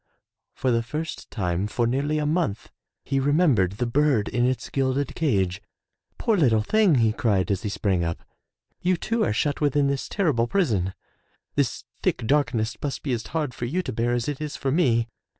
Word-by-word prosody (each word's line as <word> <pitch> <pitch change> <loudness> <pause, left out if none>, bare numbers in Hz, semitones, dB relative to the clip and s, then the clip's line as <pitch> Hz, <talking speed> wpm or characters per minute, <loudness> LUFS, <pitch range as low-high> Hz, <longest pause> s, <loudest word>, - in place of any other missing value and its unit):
For 130 - 0
the 115 -1 +2
first 150 +8 -5
time 90 -2 -1
for 120 +3 0
nearly 140 +6 0
a 150 - 0
month 155 - -1 0.3
he 135 0 0
remembered 135 - +3
the 120 +4 -2
bird 135 -3 +2
in 120 +1 +1
its 130 0 -2
gilded 135 0 0
cage. 100 - 0 0.6
"Poor 225 - +1
little 120 - +3
thing,'* 210 - +4
he 115 -3 +3
cried 100 -5 +1
as 95 - 0
he 105 - -3
sprang 95 -4 0
up, 85 0 -3 0.6
''You 180 0 +2
too 230 +1 0
are - - +1
shut 145 +8 0
within 145 -1 +2
this 140 -1 -1
terrible 150 - +1
prison. 105 - 0 0.6
This - - 0 0.2
thick - - 0
darkness 125 -4 +1
must 140 -2 -3
be 135 - -1
as 115 -2 -3
hard 150 -5 -2
for 120 - -4
you 175 +10 -1
to 130 - -4
bear 120 +2 0
as 120 -1 -1
it 145 0 -3
is 150 -1 -4
for 135 - -1
me.'' 120 -8 +2
130 Hz, 190 wpm, -25 LUFS, 110-150 Hz, 0.6 s, thing